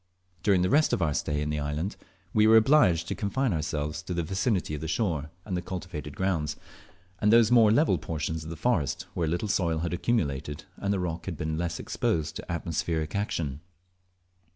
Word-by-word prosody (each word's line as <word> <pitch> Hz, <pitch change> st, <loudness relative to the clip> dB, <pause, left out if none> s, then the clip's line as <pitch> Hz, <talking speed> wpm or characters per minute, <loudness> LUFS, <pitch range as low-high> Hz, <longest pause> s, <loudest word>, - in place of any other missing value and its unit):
During 95 Hz, -1 st, +3 dB
the 90 Hz, -, +2 dB
rest 150 Hz, +1 st, +4 dB
of -, -, +1 dB
our 75 Hz, -3 st, +1 dB
stay 75 Hz, +1 st, -1 dB
in 75 Hz, -, -2 dB
the 75 Hz, -, -1 dB
island 75 Hz, +6 st, -2 dB, 0.4 s
we 110 Hz, 0 st, +5 dB
were 110 Hz, 0 st, +8 dB
obliged 110 Hz, -, +4 dB
to -, -, -1 dB
confine 120 Hz, +3 st, 0 dB
ourselves 75 Hz, -1 st, -2 dB
to 90 Hz, -, -5 dB
the 85 Hz, -, 0 dB
vicinity 95 Hz, 0 st, 0 dB
of 75 Hz, -, -4 dB
the 80 Hz, -, -3 dB
shore 80 Hz, -5 st, -1 dB, 0.2 s
and 95 Hz, -, -3 dB
the 90 Hz, -, -1 dB
cultivated 85 Hz, -5 st, -6 dB
grounds, 90 Hz, -6 st, -1 dB, 0.6 s
and 105 Hz, -, +3 dB
those 115 Hz, 0 st, +6 dB
more 115 Hz, -3 st, +6 dB
level 150 Hz, +8 st, +3 dB
portions 80 Hz, 0 st, -3 dB
of 80 Hz, -, -8 dB
the 85 Hz, -, -5 dB
forest 80 Hz, -, 0 dB
where 85 Hz, -2 st, -1 dB
a -, -, 0 dB
little 85 Hz, +6 st, -1 dB
soil 85 Hz, -5 st, +1 dB
had 85 Hz, +2 st, -2 dB
accumulated 75 Hz, -, -1 dB
and 100 Hz, -, -1 dB
the 100 Hz, -, +1 dB
rock 85 Hz, -2 st, -3 dB
had 90 Hz, -5 st, -4 dB
been 80 Hz, +1 st, -2 dB
less 85 Hz, +1 st, -2 dB
exposed 80 Hz, -2 st, -1 dB
to -, -, -7 dB
atmospheric 80 Hz, -1 st, -2 dB
action. 80 Hz, -8 st, -2 dB
85 Hz, 200 wpm, -28 LUFS, 75-100 Hz, 0.6 s, were